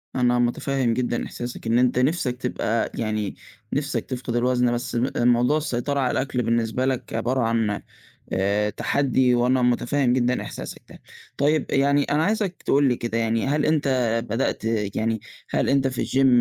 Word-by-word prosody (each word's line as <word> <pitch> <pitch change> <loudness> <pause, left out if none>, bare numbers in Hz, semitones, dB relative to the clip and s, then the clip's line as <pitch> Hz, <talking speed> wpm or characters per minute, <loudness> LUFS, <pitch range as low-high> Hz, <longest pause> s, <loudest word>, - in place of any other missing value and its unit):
أنا 125 -1 +2
مُتفهم 120 0 0
جدًا 120 0 -1
إحساسك 120 -1 -6
إن 115 +2 +3
أنت 125 0 +2
نِفسك 130 -3 0
تبقى 115 -2 -1
يعني 110 -3 -2 0.4
نِفسك 145 0 -1
تفقد 125 -2 -4
الوزن 125 0 +2
بس 120 0 -3
م 125 +3 +1
موضوع 120 +4 +3
السيطرة 140 -1 -1
على 130 - +1
الأكل 130 -2 -1
بالنسبة 115 +2 0
لك 130 -3 -2
عبارة 120 +3 0
عن 115 -2 0 0.5
آآ 100 +2 +1
تحدّي، 130 0 +1
وأنا 125 +1 +2
مُتفهم 125 +2 +2
جدًا 125 0 +1
إحساسك - - -8
ده. - - -15 0.3
طيّب 150 +1 +2
آآ، - - -1
يعني 140 +1 +3
أنا 150 +3 +1
عايزك 205 -3 -1
تقول 140 0 +3
لي 125 - +1
كده 115 -1 -2
يعني 115 +1 0
هل 145 +2 +1
أنت 155 -3 +1 0.4
بدأت 115 -1 -1 0.3
يعني 110 -1 0 0.3
هل - - 0
أنت 135 -1 +3
في 130 - -2
الgym 135 0 +2
125 Hz, 170 wpm, -24 LUFS, 120-135 Hz, 0.5 s, إن